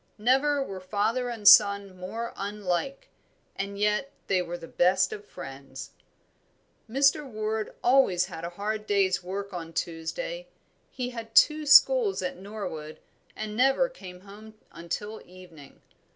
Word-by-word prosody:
Never 270 +6 +2
were 195 -7 -7
father 215 +6 -1
and 220 -4 -3
son 200 -2 +6
more 205 +6 -6
unlike; 205 +5 -3 0.5
and 200 0 -5
yet 210 +7 0
they 185 -2 +1
were 175 0 -5
the 165 -1 -11
best 185 +3 +2
of 205 - -8
friends. 135 -7 -10 1.0
Mr. 275 +5 +3
Ward 215 -4 -4
always 240 -9 +4
had 170 -3 -9
a 170 - -3
hard 210 +4 -4
day's 195 -2 +2
work 200 +2 -5
on 165 -2 -7
Tuesday. - - -4 0.4
He 250 -1 -5
had 225 -2 -9
two 305 -1 +5
schools 430 - +6
at 180 - -3
Norwood, 185 -6 -7 0.4
and 215 -1 -5
never 270 - +3
came 180 - -12
home 210 +2 -13 0.2
until 205 +6 -6
evening. 175 -6 -15
205 Hz, 135 wpm, -27 LUFS, 180-245 Hz, 1.0 s, son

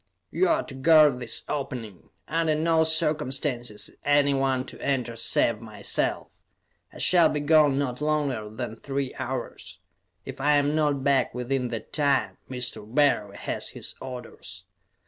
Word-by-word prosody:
"You 375 - +2
are 325 0 +2
to - - -9
guard 150 -1 +5
this 120 -2 -2
opening. 125 -9 -5 0.2
Under 165 -1 +1
no 160 +1 +3
circumstances 140 -7 -1
is - - -21
anyone 135 -2 +2
to - - -10
enter 125 -4 -1
save 115 -1 +1
myself. 105 -3 -2 0.6
I - - -13
shall 170 -3 +5
be 150 - -1
gone 145 -2 +4
not 130 -2 -2
longer 145 -8 -1
than 115 0 -6
three 135 +1 -3
hours; - - -5 0.5
if - - -7
I 150 +2 +3
am 145 0 +2
not 145 -3 +1
back 135 -4 +2
within 125 +1 -1
that 115 -3 -7
time, 135 -10 +1
Mr. 125 -1 -4
Barry 125 -8 +2
has - - -3
his - - -4
orders. 120 -8 -8
135 Hz, 145 wpm, -26 LUFS, 120-150 Hz, 0.6 s, guard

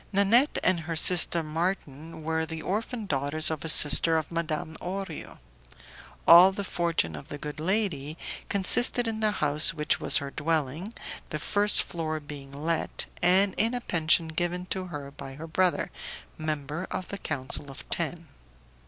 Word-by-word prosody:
Nanette 215 +8 +2
and 185 -2 +2
her 165 0 -6
sister 170 0 +6
Marton 160 -1 -5
were 160 +1 -2
the 160 0 -7
orphan 220 +3 -4
daughters 145 0 +2
of 155 -3 -5
a 160 - -3
sister 160 +2 +7
of 155 0 -4
Madame 160 -1 -4
Orio. 190 -2 -7 0.9
All 175 +3 +8
the 200 +1 -6
fortune 170 - -1
of 75 - -11
the 145 - -7
good 150 +1 -8
lady 165 -5 -2 0.3
consisted 235 +5 +4
in 220 -1 -3
the 215 -1 +1
house 155 -5 +3
which 150 -1 -1
was - - +3
her 140 -1 -4
dwelling, 160 - -3 0.3
the 155 - -4
first 205 +6 +1
floor 160 -2 -5
being 145 -2 -11
let, 155 +4 -3 0.2
and 185 +3 +3
in 230 +3 +1
a 245 - -4
pension 160 -4 +1
given 175 +2 -3
to 185 -1 -3
her 145 -4 -8
by 140 -1 -10
her 155 +3 -9
brother, 180 +2 -1 0.4
member 155 +2 -5
of 185 - -6
the 200 - -7
council 140 -2 -2
of 135 - -12
ten. 170 0 -4
165 Hz, 160 wpm, -26 LUFS, 150-185 Hz, 0.9 s, All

